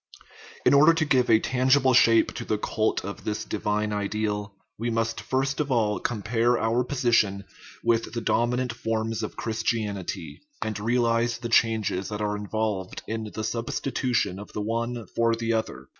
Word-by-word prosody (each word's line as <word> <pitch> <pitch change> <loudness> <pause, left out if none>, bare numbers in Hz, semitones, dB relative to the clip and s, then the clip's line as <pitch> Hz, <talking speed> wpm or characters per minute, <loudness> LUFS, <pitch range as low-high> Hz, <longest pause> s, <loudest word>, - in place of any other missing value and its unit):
In - - +6
order 155 +4 +7
to 160 -1 +1
give 130 -4 +2
a 110 -1 +6
tangible 130 +2 +3
shape 115 -2 +5
to - - -5
the 110 - -1
cult 110 -1 -1
of 100 - -7
this 105 0 -3
divine 105 0 -1
ideal, 105 0 -2 0.2
we 120 +1 -1
must 115 0 -1
first 135 +1 -1
of 145 -2 -1
all 110 -4 +1
compare 115 +2 +1
our 115 +3 +1
position 120 -7 +1 0.4
with 115 -1 +1
the 115 - -2
dominant 120 +2 0
forms 115 -1 -2
of - - -5
Christianity, 105 -8 -3 0.2
and 110 -1 -3
realize 115 +1 +1
the 120 0 -5
changes 110 -5 +2
that 105 -1 -4
are 105 -1 -1
involved 105 -2 -3
in 110 -1 -4
the 110 - -3
substitution 115 -3 -1
of 105 - -10
the 105 - -3
one 115 +2 -2
for 115 0 +2
the 115 0 -1
other. 90 - -3
115 Hz, 165 wpm, -26 LUFS, 105-120 Hz, 0.4 s, order